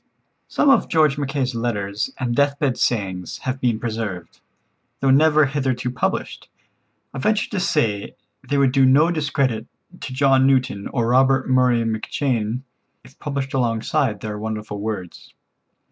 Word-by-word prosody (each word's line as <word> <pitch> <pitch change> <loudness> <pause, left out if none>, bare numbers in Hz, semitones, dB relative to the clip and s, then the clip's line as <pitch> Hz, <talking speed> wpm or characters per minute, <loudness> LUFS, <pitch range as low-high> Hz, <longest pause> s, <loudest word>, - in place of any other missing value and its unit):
Some 280 - +3
of - - +3
George 155 -3 +2
Mackay's 140 -2 -2
letters 105 -3 -2
and 120 -2 -2
deathbed 140 -1 +1
sayings 95 -6 -1
have 130 +1 -3
been 120 -3 +1
preserved. 110 -8 -5 0.6
Though 135 -1 +2
never 155 +2 +5
hitherto 130 -3 -2
published, 125 - -3 0.6
I 135 - -5
venture 215 +9 0
to 205 - -1
say 110 - 0 0.3
they 145 - +1
would 135 -2 +3
do 135 0 +3
no 145 +6 +5
discredit 145 -7 -1 0.3
to - - -7
John 135 0 +3
Newton 130 -7 +1
or 120 -3 -1
Robert 130 +1 +3
Murray 125 -2 +3
McCheyne, 115 +1 -2 0.4
if 130 +3 -19
published 140 -2 -4
alongside 120 +1 0
their 105 -1 -5
wonderful 105 -1 -5
words. 100 -4 -6
130 Hz, 140 wpm, -21 LUFS, 110-140 Hz, 0.6 s, never